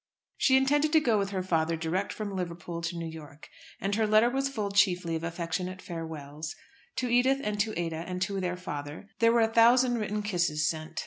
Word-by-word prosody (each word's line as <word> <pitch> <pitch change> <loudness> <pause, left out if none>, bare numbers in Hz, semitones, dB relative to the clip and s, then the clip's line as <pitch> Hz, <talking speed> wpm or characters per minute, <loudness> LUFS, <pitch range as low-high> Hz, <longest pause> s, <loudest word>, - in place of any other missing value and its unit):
She 265 -1 +4
intended 290 +3 +2
to 320 - +7
go 235 -8 +2
with 195 -1 -1
her 190 -2 -2
father 165 -2 +1
direct 165 +5 -2
from 205 -2 -5
Liverpool 170 -2 -5
to 165 +1 -3
New 170 - -4
York, 155 -2 -10 0.3
and 195 +2 -1
her 215 +1 +2
letter 215 +3 +5
was 270 +1 0
full 210 -7 -3
chiefly 180 -4 +2
of 160 - -4
affectionate 170 +2 -3
farewells. 155 -3 -6 0.4
To 255 - -1
Edith 250 +3 +3
and 210 0 -2
to 215 -2 0
Ada 165 -2 -2
and 180 0 -4
to 195 +1 -2
their 180 -1 -2
father 150 +1 -7
there 230 0 +5
were 235 0 +4
a 225 0 +1
thousand 240 +1 +5
written 210 0 -2
kisses 170 -6 0
sent. 155 0 -3
185 Hz, 205 wpm, -29 LUFS, 165-225 Hz, 0.4 s, to